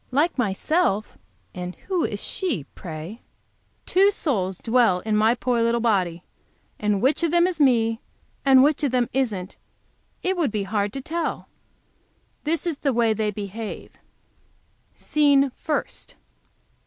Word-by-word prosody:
Like 295 +7 +1
myself! 220 - 0 0.4
And 180 0 -6
who 365 -4 0
is 205 - -3
she, 310 - -1
pray! 170 +5 -8 0.6
Two 390 +2 +4
souls 200 - -1
dwell 225 -6 +2
in 215 +1 -1
my 220 +3 +4
poor 245 -1 0
little 235 +1 +2
body, 185 -7 0 0.6
and 210 -1 0
which 275 +6 +2
of 335 - +2
them 345 +2 +4
is 355 -4 -1
me, 230 -4 +3 0.4
and 265 -1 +6
which 300 +1 +2
of 285 - +2
them 245 -1 +1
isn't, 210 -8 -2 0.7
it 375 +1 +1
would 335 -5 +1
be 210 -2 -1
hard 205 +1 -1
to 270 - -5
tell. 330 +4 -3 1.0
This 330 +3 0
is 335 -5 -2
the 275 -3 0
way 230 -2 +3
they 215 0 -1
behave: 210 +1 -6 1.0
SCENE 280 -2 +3
FIRST. 300 +4 -4
235 Hz, 140 wpm, -24 LUFS, 205-295 Hz, 1.0 s, and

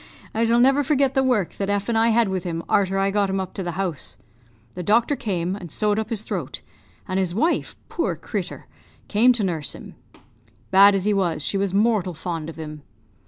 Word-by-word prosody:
I 225 +1 +1
shall 230 +1 +3
never 270 +3 +5
forget 275 -1 +2
the 270 - +3
work 245 -9 0
that 195 0 -2
F 205 0 0
and 235 - 0
I 225 +1 +4
had 230 -1 +3
with 190 -2 -2
him 165 -2 -3
arter 195 -1 +2
I 195 0 +1
got 200 -1 +1
him 190 0 -1
up 190 -1 -5
to - - -4
the 175 -2 -3
house. 155 - -3 0.6
"The 180 - -5
doctor 230 - +2
came, 185 -6 -2
and 180 -4 -8
sewed 210 +5 0
up 220 - -3
his 220 -2 -2
throat; - - -5 0.5
and 185 0 -1
his 180 -2 -1
wife 320 +11 0
poor - - -1
crittur! - - -5 0.4
came 230 +5 +4
to 230 -3 +1
nurse 165 -7 -3
him. - - -11 0.8
Bad 200 +1 +7
as 195 -1 -1
he 210 - +3
was, 175 -6 0
she - - -1
was 195 -1 0
mortal 205 -5 +2
fond 165 -1 -4
of 165 - -8
him! 150 -2 -8
195 Hz, 215 wpm, -23 LUFS, 180-225 Hz, 0.8 s, Bad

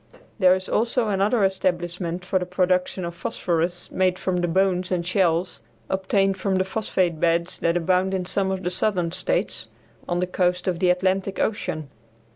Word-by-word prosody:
There 185 -1 +6
is 185 0 -5
also 230 0 +1
another 205 +3 +2
establishment 180 -2 -1
for 190 0 +1
the 180 - -3
production 180 0 0
of 170 - -5
phosphorus 175 -2 -2
made 185 -1 +1
from 185 -1 -1
the 175 0 0
bones 185 +1 +1
and 175 -2 0
shells 180 -1 +1 0.3
obtained 195 0 +1
from 190 0 0
the 185 - +2
phosphate 190 -4 -1
beds 170 +1 +1
that 170 +1 +1
abound 185 +2 +1
in 185 -1 -2
some 190 +1 0
of 190 0 -3
the 180 - -1
southern 180 -3 0
states, 185 - -1 0.4
on 175 - 0
the 180 - +1
coast 180 0 0
of 175 -2 0
the 180 - +3
Atlantic 190 +2 +1
Ocean. 155 -9 -2
185 Hz, 175 wpm, -24 LUFS, 175-190 Hz, 0.4 s, There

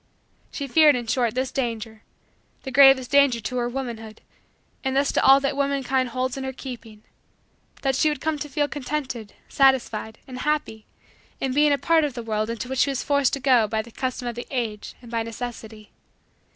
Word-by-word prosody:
She 280 - -5
feared 300 +1 +5
in 240 -1 -3
short 240 0 0
this 260 0 -1
danger 225 -4 -4 0.6
the 265 - -6
gravest 270 -1 +6
danger 280 -4 +4
to 240 +4 -4
her 240 0 0
womanhood 235 -4 -6 0.6
and 265 -1 -1
thus 275 +1 +2
to - - +1
all 270 +1 +7
that 275 0 -1
womankind 270 -2 0
holds 255 +2 -2
in 270 - -4
her 265 - -3
keeping 230 -5 -10 0.8
that 270 -1 +1
she 310 - +3
would 295 -2 -3
come 315 0 -2
to 295 - -5
feel 290 +1 0
contented, 265 -7 -5
satisfied, 240 -5 +1
and 255 -1 -8
happy, 290 -8 -2 0.5
in 265 -1 -1
being 295 +2 +4
a 285 - +3
part 325 +4 +3
of 285 -5 -2
the 240 - -5
world 215 -1 -2
into 230 +2 -4
which 265 0 -3
she 280 - +3
was 270 -2 -2
forced 280 -3 +2
to 275 - -1
go 250 -5 +3
by 220 +1 -2
the 235 - -14
custom 255 0 -4
of 240 - -3
the 240 +1 -7
age 225 -5 -4
and 240 - -12
by 230 -1 -1
necessity. 225 -2 -7
255 Hz, 200 wpm, -24 LUFS, 230-275 Hz, 0.8 s, all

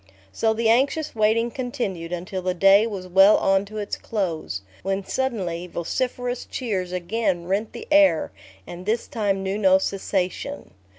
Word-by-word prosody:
So 220 - +1
the 230 0 0
anxious 275 +7 +2
waiting 225 +2 +2
continued 220 -10 -4
until 180 +2 -4
the 185 0 -1
day 195 +4 +5
was 195 -4 -6
well 195 +3 +6
on 195 +1 +2
to 215 +2 -9
its 205 -1 -3
close, 165 - -3 0.2
when 195 +1 -2
suddenly, 190 -11 -2
vociferous 245 +8 -3
cheers 195 -8 -3
again 180 0 -1
rent 200 +4 -1
the - - -8
air, 295 - +4 0.3
and 180 +2 -9
this 225 +2 0
time 200 -4 -1
knew 195 +2 -2
no 190 -2 +5
cessation. 195 +7 -3
195 Hz, 155 wpm, -23 LUFS, 185-230 Hz, 0.3 s, well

